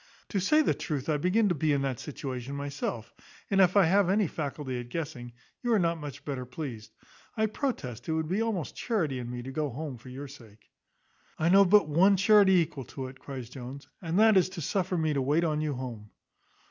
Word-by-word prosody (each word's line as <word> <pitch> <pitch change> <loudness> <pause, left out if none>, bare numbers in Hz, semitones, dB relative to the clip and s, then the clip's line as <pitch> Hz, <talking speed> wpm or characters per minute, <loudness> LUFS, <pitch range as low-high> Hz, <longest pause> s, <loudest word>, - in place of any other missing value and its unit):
To 200 - 0
say 305 +12 +4
the - - +2
truth, 145 -2 -4
I 150 - +2
begin 185 +8 +2
to - - +2
be 155 -1 0
in 140 -1 +1
that 130 -4 -2
situation 135 -2 -5
myself; 140 -5 -4 0.4
and 195 0 +5
if 185 +1 +4
I 195 - +7
have 190 +2 +3
any 205 +2 +3
faculty 145 -5 -4
at 120 0 -8
guessing, 140 -6 -5 0.3
you 240 - -1
are - - +5
not 170 -3 +1
much 145 -1 -8
better 135 -3 -3
pleased. 125 -4 -7 0.5
I 220 - +3
protest 205 - -4
it - - +1
would 160 0 -1
be 190 +6 0
almost 220 -8 -2
charity 165 - -1
in 120 -1 -5
me 120 0 -5
to 135 - -6
go 150 +1 -1
home 135 -1 -6
for 130 - -12
your 135 +3 -7
sake." 115 -6 -16 0.7
"I 160 - +1
know 195 +2 +7
but 195 -3 +5
one 185 +6 +4
charity 200 0 +6
equal 155 -7 +1
to 130 -2 -6
it," 130 0 -14
cries 130 -4 -7
Jones, 130 +2 -8
"and 170 0 -2
that 220 -1 +6
is 185 - +4
to 185 -2 -7
suffer 185 +3 -1
me 160 -2 +1
to 140 - 0
wait 145 +6 +2
on 155 -2 0
you 150 -2 -1
home." 120 -5 -7
150 Hz, 225 wpm, -29 LUFS, 130-185 Hz, 0.7 s, I